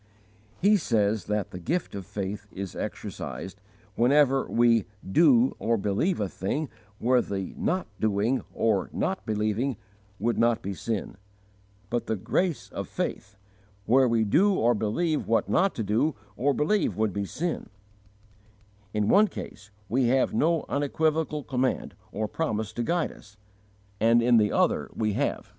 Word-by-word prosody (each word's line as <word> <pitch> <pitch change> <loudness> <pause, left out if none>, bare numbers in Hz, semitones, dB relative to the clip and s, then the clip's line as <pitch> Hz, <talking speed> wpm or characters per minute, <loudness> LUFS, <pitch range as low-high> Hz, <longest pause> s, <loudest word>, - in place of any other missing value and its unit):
He 205 +3 +5
says 110 - +1
that 105 -1 -2
the 90 - -7
gift 170 - -2
of 100 -3 -6
faith 100 +1 -5
is 95 -1 -6
exercised, 95 +10 -6 0.3
whenever 135 +3 +3
we 115 -2 +3 0.2
"do 235 - +4
or 115 0 +1
believe 105 - 0
a 105 - 0
thing 135 +11 -3 0.3
where 125 +3 +3
the 95 -3 -4
not 185 +2 -1
doing 110 +4 +1
or 110 -4 +1
not 95 - -2
believing 110 +4 0 0.4
would 120 +2 0
not 115 -1 +2
be 100 - -3
sin"; 105 -1 -4 0.7
but 120 0 -1
the 110 - 0
grace 165 - -1
of - - -5
faith, 100 0 -4 0.5
"where 130 +4 +5
we 115 -1 +2
do 190 - +3
or 120 -7 +3
believe 135 +10 -1
what 115 - +2
not 195 +1 +2
to 115 - -2
do 115 +9 +1 0.2
or 140 +6 +2
believe 165 +9 +1
would 110 -3 +1
be 100 - -2
sin"; 170 - -3 1.3
in 105 -1 +1
one 210 - +6
case 105 - -9 0.2
we 130 +4 +1
have 130 +2 +2
no 165 0 +2
unequivocal 155 +1 0
command 130 -1 -1 0.2
or 110 +1 -2
promise 110 -7 -2
to 120 - -3
guide 170 +8 0
us, 105 +1 -17 0.6
and 115 +2 +4
in 120 0 +5
the 105 -2 +3
other - - +1
we 110 -2 0
have. - - -1
115 Hz, 150 wpm, -27 LUFS, 105-150 Hz, 1.3 s, one